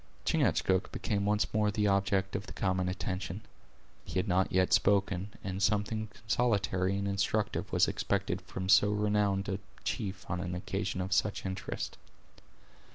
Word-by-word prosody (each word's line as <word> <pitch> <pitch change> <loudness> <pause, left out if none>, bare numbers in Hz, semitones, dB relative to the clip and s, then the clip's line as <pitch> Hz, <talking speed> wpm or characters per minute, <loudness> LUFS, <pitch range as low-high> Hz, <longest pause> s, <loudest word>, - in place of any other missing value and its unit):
Chingachgook 95 0 +2
became 100 -1 -1
once 105 0 +1
more 105 -1 +3
the 105 +1 0
object 95 -1 +1
of 100 +1 -3
the - - -8
common 95 -1 0
attention. 95 +1 -3 0.6
He - - -5
had 95 +3 +1
not 95 0 +2
yet 95 -1 +3
spoken, 100 0 +2
and 95 0 -3
something 105 +2 +1
consolatory 100 -4 0
and 100 0 -1
instructive 100 +1 0
was - - +4
expected 100 -2 -1
from 95 +1 -5
so 95 +2 +6
renowned 105 -1 +1
a 100 -2 -2 0.2
chief 95 -1 -3
on 90 - -2
an 90 0 -3
occasion 95 +1 -2
of 95 +1 -1
such 100 0 +1
interest. 95 -1 -4
100 Hz, 155 wpm, -31 LUFS, 95-105 Hz, 0.6 s, so